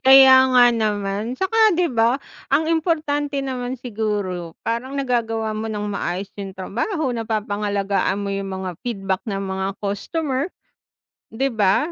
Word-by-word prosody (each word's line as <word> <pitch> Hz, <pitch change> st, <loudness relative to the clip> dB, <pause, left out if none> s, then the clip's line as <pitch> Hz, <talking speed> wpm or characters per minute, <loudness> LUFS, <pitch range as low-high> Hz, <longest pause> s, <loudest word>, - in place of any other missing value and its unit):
Kaya 265 Hz, -1 st, +9 dB
nga 245 Hz, -1 st, +7 dB
naman 210 Hz, 0 st, -1 dB
'tsaka 430 Hz, +5 st, +3 dB
'di 345 Hz, -1 st, +1 dB
ba, 230 Hz, 0 st, +3 dB, 0.4 s
ang 315 Hz, +4 st, +2 dB
importante 300 Hz, -4 st, 0 dB
naman 255 Hz, -1 st, -3 dB
siguro, 205 Hz, -8 st, -3 dB
parang 240 Hz, +4 st, -3 dB
nagagawa 230 Hz, -5 st, -1 dB
mo 215 Hz, +1 st, -3 dB
ng 215 Hz, -2 st, -3 dB
maayos 195 Hz, -1 st, -3 dB
yung 195 Hz, -1 st, -6 dB
trabaho, 255 Hz, -, -2 dB
napapangalagaan 205 Hz, -4 st, -1 dB
mo 200 Hz, -, -3 dB
yung 195 Hz, 0 st, -3 dB
mga 185 Hz, -3 st, -5 dB
feedback 195 Hz, -5 st, -1 dB
ng 195 Hz, -2 st, -2 dB
mga 190 Hz, 0 st, -2 dB, 0.2 s
customer 265 Hz, +8 st, -2 dB, 0.9 s
'di 270 Hz, +3 st, 0 dB
ba? 215 Hz, -, +2 dB
225 Hz, 135 wpm, -22 LUFS, 200-270 Hz, 0.9 s, Kaya